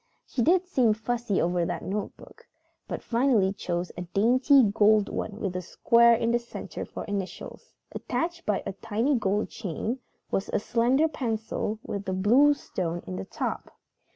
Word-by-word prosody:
She 250 - -3
did 355 +7 +3
seem 250 -11 +2
fussy 230 -2 -1
over 175 0 +1
that - - -3
notebook, 205 +1 -6 0.4
but - - -5
finally 230 -6 +2
chose 175 -2 -3
a - - -5
dainty 245 - +4
gold 210 0 +4
one 210 0 -4
with 195 -5 -3
a 180 - -2
square 235 +6 +4
in 230 0 0
the 240 - +2
center 235 - -7
for - - -7
initials. 200 -2 -6 0.2
Attached 340 0 -3
by 210 -2 -1
a - - -3
tiny 225 +8 -1
gold 205 -2 0
chain 220 +5 -4 0.3
was 195 - -1
a - - +1
slender 245 +8 +2
pencil 220 -6 -3
with 200 -1 -5
a - - 0
blue 245 +10 +5
stone 175 -9 -4
in 95 - -5
the 95 +1 -5
top. - - -5
220 Hz, 165 wpm, -27 LUFS, 190-245 Hz, 0.4 s, blue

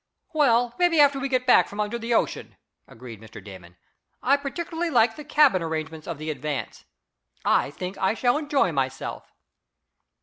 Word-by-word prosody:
"Well, 245 -6 +3
maybe 350 -3 +3
after 285 -1 +5
we 275 0 -3
get 255 -1 0
back 250 - +5
from 205 - -10
under 210 +3 -2
the 230 +1 -5
ocean," 230 - -1 0.3
agreed 115 -2 -12
Mr. 110 0 -12
Damon. 90 -3 -13 0.5
"I 275 +3 +4
particularly 330 +4 -4
like 230 -5 +3
the 300 - -9
cabin 290 - +3
arrangements 160 -1 -5
of 170 - -4
the 155 +1 -4
Advance. 140 -4 -5 0.6
I - - +2
think 180 +6 -7
I 190 +3 +1
shall 245 +4 +1
enjoy 290 - +1
myself." 135 -2 -4
225 Hz, 165 wpm, -24 LUFS, -, 0.6 s, after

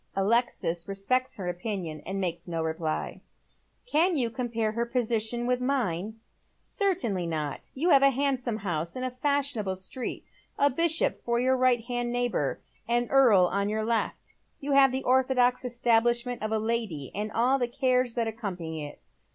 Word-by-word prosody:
Alexis 195 -5 0
respects 255 +7 0
her 190 -3 -5
opinion, 175 -4 -4
and 195 +1 -3
makes 175 -2 -2
no 165 -2 -2
reply. 160 -1 -3 0.3
" - - -34 0.3
Can 350 -5 +2
you 240 -4 0
compare 230 -2 -1
her 235 +2 -1
position 235 -1 -1
with 250 0 +1
mine? 220 -7 -1 0.2
" - - -40
" - - -45 0.2
Certainly 280 - 0
not. 155 -3 -4
You 335 +7 +1
have 275 - +7
a 275 - +7
handsome 260 -4 -1
house 170 -5 -3
in 255 - -4
a 255 - -2
fashionable 255 -7 -1
street, 190 +7 -4 0.3
a 285 0 +4
bishop 330 +4 +1
for 235 0 0
your 260 +1 +3
right 255 -2 +3
hand 240 0 -3
neighbour, 245 -1 -1 0.3
an 240 0 +1
earl 245 -9 +6
on 200 +3 0
youi 215 +1 -1
left 230 0 -1
hand. - - -18 0.2
You 285 +1 -4
have 275 -1 +6
the 265 +1 -2
orthodox 255 -1 +3
establishment 240 0 +1
of 215 0 -2
a 220 - +2
lady, 220 - -2
and 210 +2 -3
all 250 +5 +2
the 245 - +1
cares 255 -1 +1
that 230 -2 0
accompany 180 -8 -5
it. 145 0 -9
235 Hz, 175 wpm, -28 LUFS, 195-255 Hz, 0.3 s, have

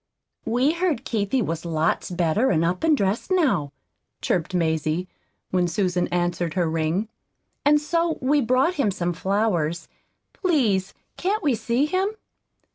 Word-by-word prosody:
"We 250 +5 +2
heard 335 -7 -1
Keithie 220 +3 0
was 165 0 -3
lots 160 -1 0
better 180 +7 +1
and 165 -1 +2
up 180 - -1
and 315 -2 +4
dressed 200 +1 -1
now," 255 - +2 0.5
chirped 180 +2 -1
Mazie, 160 +1 0 0.4
when 180 -1 +2
Susan 180 -1 0
answered 175 -1 -1
her 175 -3 +1
ring; 160 +6 -1 0.6
"and 295 +1 +5
so 335 +2 0
we've 270 -1 +1
brought 260 +8 +3
him 215 - +2
some 175 -2 -2
flowers. 175 -3 0 0.5
Please 225 - +1 0.2
can't 405 +4 -1
we 285 -4 +3
see 235 +4 0
him?" 375 +6 0
200 Hz, 140 wpm, -24 LUFS, 175-285 Hz, 0.6 s, and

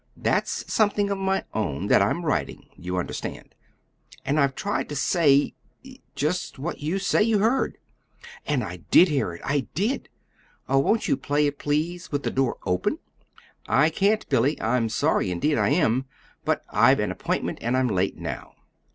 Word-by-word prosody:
That's - - -1
something 205 -2 +2
of 200 - -2
my 195 0 0
own 75 -11 -2
that - - +4
I'm - - 0
writing, - - -2
you 90 +1 -4
understand; 90 - -5 0.7
and 145 +2 +1
I've 140 -2 +2
tried 130 0 -2
to 145 - -5
say 145 0 +3 0.6
just 155 +4 -2
what 150 +6 -4
you 155 +6 -1
say 195 +2 +1
you 220 0 +3
heard." 230 +6 +1 0.7
"And - - +1
I - - -6
did 180 - +7
hear 140 - 0
it 85 - -10
I 140 -1 0
did! 215 - -1 0.6
Oh, 135 - +3
won't 215 +11 +1
you 280 - +3
play 150 - 0
it, 145 -1 -2
please, 165 +5 -2
with 145 -1 -2
the - - -1
door 130 -2 0
open?" 90 -1 0 0.7
"I 150 +5 +3
can't, 205 +6 +1
Billy. 135 +3 +1
I'm 115 0 +1
sorry, 140 -4 +1
indeed 145 - 0
I - - +2
am. 130 -6 +2 0.4
But - - 0
I've - - +5
an - - 0
appointment, - - -3
and 120 +2 0
I'm 130 -1 +2
late 95 -3 0
now. - - -6
145 Hz, 170 wpm, -25 LUFS, 130-185 Hz, 0.7 s, did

